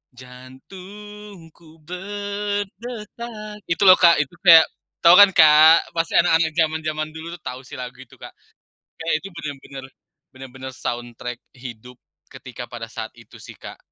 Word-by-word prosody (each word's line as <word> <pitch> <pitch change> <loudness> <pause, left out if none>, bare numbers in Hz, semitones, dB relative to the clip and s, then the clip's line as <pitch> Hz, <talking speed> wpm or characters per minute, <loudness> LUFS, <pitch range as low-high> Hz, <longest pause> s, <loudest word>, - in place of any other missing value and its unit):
jantungku 165 +6 -14
berdetak 205 +4 -6
itu 170 +3 -1
loh, 185 -1 +8
Kak. 170 -2 +6
Itu 140 - -20
kayak 165 -2 +9 0.4
tau 170 - +8
kan, 205 - +10
Kak? 155 0 +6
Pasti 165 0 -2
anak-anak 160 0 +3
zaman-zaman 155 -1 -1
dulu 165 +2 -8
tuh 170 - -18
tahu 125 +1 -6
sih - - -10
lagu 125 0 -8
itu, 130 - -16
Kak, - - -12 0.7
kayak 165 0 -2
Itu 195 - -8
bener-bener 140 -3 -9 0.5
bener-bener 130 0 -10
soundtrack 120 0 -6 0.2
hidup 125 -1 -11 0.4
ketika - - -10
pada - - -8
saat - - -7
itu - - -17
sih, - - -12
Kak. - - -11
165 Hz, 140 wpm, -21 LUFS, 135-195 Hz, 0.7 s, kan